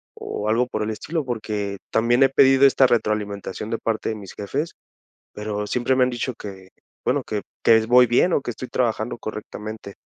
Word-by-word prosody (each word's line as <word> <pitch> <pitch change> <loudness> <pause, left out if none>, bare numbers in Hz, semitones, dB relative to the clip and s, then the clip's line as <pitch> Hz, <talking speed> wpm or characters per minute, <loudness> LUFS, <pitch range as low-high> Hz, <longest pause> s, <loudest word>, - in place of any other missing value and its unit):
o 105 +1 -4
algo 120 +3 +2
por 110 -3 -3
el 110 - -2
estilo, 155 +8 -3
porque 105 -4 -3
también 120 +3 +2
he - - +7
pedido 135 0 +5
esta 135 0 +4
retroalimentación 105 -3 -2
de 115 - 0
parte 110 -1 -2
de 110 - -2
mis 100 -3 -10
jefes, 140 +11 -3 0.6
pero 105 0 -4
siempre 125 +3 +1
me 130 - +4
han 125 - +2
dicho 125 +1 -3
que, 95 -2 -9 0.4
bueno, - - +2
que 105 -2 -3 0.2
que 115 - +7
es 110 - 0
voy 125 0 +6
bien, 125 +10 +3
o - - +2
que 125 - -6
estoy 125 +2 -8
trabajando 120 -1 -1
correctamente. 110 -1 -7
110 Hz, 195 wpm, -23 LUFS, 105-125 Hz, 0.6 s, he